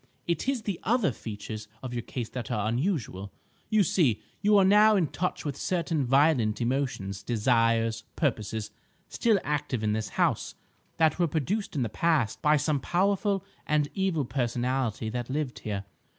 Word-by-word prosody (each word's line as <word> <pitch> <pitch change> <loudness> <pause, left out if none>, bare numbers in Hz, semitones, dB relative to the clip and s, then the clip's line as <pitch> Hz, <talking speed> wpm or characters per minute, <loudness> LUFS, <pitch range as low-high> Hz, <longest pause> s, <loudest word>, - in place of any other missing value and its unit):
It 170 +9 -1
is 260 -5 -1
the 200 -5 -3
other 225 - +2
features 110 -1 -7 0.2
of 125 -2 -5
your 120 - -2
case 115 0 -5
that 120 -3 -6
are 110 -3 -1
unusual. 115 - -2 0.4
You 215 -2 +4
see, 145 - +2 0.2
you 210 +1 +5
are 195 - +6
now 210 +2 +6
in 185 -4 +3
touch 180 -2 -3
with 145 -3 -2
certain 165 -2 -1
violent 135 -4 +3
emotions, 120 -6 -2
desires, 115 0 +1
purposes, 110 -6 -1 0.4
still 225 -4 +2
active 145 -5 -2
in 105 -1 +1
this 110 0 -2
house, - - +1 0.4
that 160 0 +3
were 175 - +3
produced 170 +7 -2
in 135 - +1
the - - 0
past 140 0 +1
by 150 0 +4
some 145 0 +1
powerful 195 +4 +1 0.2
and 150 -1 +2
evil 190 -7 0
personality 120 -2 -1
that 120 +1 -4
lived 140 -2 -2
here. 100 -2 -4
135 Hz, 165 wpm, -28 LUFS, 115-175 Hz, 0.4 s, are